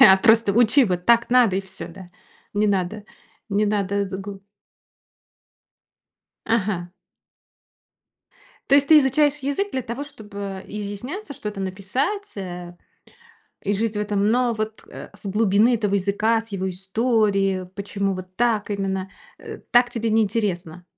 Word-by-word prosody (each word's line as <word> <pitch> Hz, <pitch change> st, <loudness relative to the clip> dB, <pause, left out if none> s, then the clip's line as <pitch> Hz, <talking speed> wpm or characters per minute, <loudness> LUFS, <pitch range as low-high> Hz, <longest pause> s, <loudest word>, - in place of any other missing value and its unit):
А, 190 Hz, 0 st, +9 dB
просто 220 Hz, 0 st, +4 dB
учи, 240 Hz, +4 st, +5 dB
вот 180 Hz, -3 st, -2 dB
так 235 Hz, 0 st, +4 dB
надо 240 Hz, -7 st, +5 dB
и -, -, +1 dB
всё, 190 Hz, -, -9 dB
да. 180 Hz, +1 st, -12 dB, 0.4 s
Не 210 Hz, +1 st, +2 dB
надо. 200 Hz, +1 st, -1 dB, 0.5 s
Не 210 Hz, +1 st, +2 dB
надо 200 Hz, -1 st, 0 dB
згу 195 Hz, +1 st, -7 dB, 2.1 s
Ага. 195 Hz, -6 st, -1 dB, 1.8 s
То 275 Hz, -, +5 dB
есть 280 Hz, 0 st, +5 dB
ты 310 Hz, -1 st, +9 dB
изучаешь 290 Hz, +2 st, +3 dB
язык 295 Hz, +9 st, -2 dB
для 260 Hz, -, -1 dB
того, 245 Hz, +5 st, -5 dB
чтобы 200 Hz, -7 st, -8 dB
изъясняться, 210 Hz, -, -6 dB
что-то 210 Hz, -7 st, -6 dB
написать, 200 Hz, -, -2 dB
э, 175 Hz, -2 st, -7 dB, 0.9 s
и 200 Hz, -, 0 dB
жить 215 Hz, +1 st, -1 dB
в -, -, 0 dB
этом, 205 Hz, 0 st, 0 dB
но 245 Hz, +1 st, +2 dB
вот, 215 Hz, 0 st, -4 dB
э, -, -, -9 dB
с -, -, -16 dB
глубины 210 Hz, +3 st, +3 dB
этого 205 Hz, -2 st, -1 dB
языка, 205 Hz, +4 st, +1 dB
с 225 Hz, -, -13 dB
его 190 Hz, -2 st, -3 dB
истории, 195 Hz, -1 st, 0 dB
почему 200 Hz, -1 st, -2 dB
вот 185 Hz, 0 st, -9 dB
так 225 Hz, -3 st, +1 dB
именно, 195 Hz, -1 st, -2 dB, 0.3 s
э, -, -, -9 dB
так 245 Hz, 0 st, +5 dB
тебе 230 Hz, -2 st, -2 dB
не 220 Hz, 0 st, +4 dB
интересно? 180 Hz, -5 st, -2 dB
205 Hz, 145 wpm, -23 LUFS, 195-230 Hz, 2.1 s, А